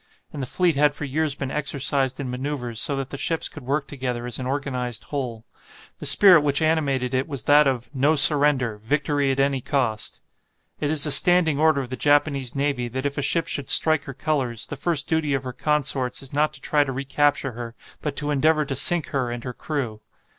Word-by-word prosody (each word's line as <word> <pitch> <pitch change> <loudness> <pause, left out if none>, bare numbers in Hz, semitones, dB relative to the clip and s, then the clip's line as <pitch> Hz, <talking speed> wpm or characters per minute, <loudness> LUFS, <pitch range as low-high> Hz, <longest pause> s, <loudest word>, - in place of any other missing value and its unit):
And 145 - -6
the 130 - -4
fleet 175 +3 0
had 145 +1 +2
for 145 - -6
years 150 +1 -1
been 135 -1 -5
exercised 140 -2 0
in 130 -3 -5
manoeuvres, 125 -3 -3
so 140 - +1
that 135 -1 -5
the 140 - -6
ships 165 -1 -1
could 145 - -11
work 140 +1 -1
together 125 -3 -5
as 125 0 -3
an 130 - -4
organized 130 -4 -3
whole. 125 -6 -6 0.5
The - - 0
spirit 185 -6 +7
which 145 -1 0
animated 145 -6 0
it 130 +1 -1
was 140 -7 -4
that 145 0 +4
of 130 -3 -2
"No 145 +3 +2
surrender 140 -6 +5
Victory 145 +4 -1
at 135 - -3
any 135 -1 0
cost." 120 -6 -2 0.6
It 145 - -2
is 155 -1 +2
a 150 - -1
standing 165 -3 +4
order 155 -2 +2
of 125 -1 -9
the 130 - -5
Japanese 140 0 0
navy 140 -3 -1
that 130 +3 -5
if 140 0 -3
a - - -1
ship 165 +3 0
should 140 -3 -4
strike 155 -2 +3
her 135 - -8
colours, 130 -6 -2
the - - -7
first 145 0 -1
duty 155 -3 0
of 135 - -4
her 130 -1 -6
consorts 135 -3 -1
is 135 - -10
not 150 +2 +1
to 135 - -12
try 150 0 +2
to 135 - -5
recapture 140 +1 -1
her, 120 0 -8 0.3
but 150 -2 -4
to 145 0 -2
endeavour 155 +2 +2
to 135 - -4
sink 165 +4 +3
her 130 -3 -2
and 120 -1 -6
her 125 - -6
crew. 120 -7 -5
140 Hz, 220 wpm, -23 LUFS, 130-150 Hz, 0.6 s, spirit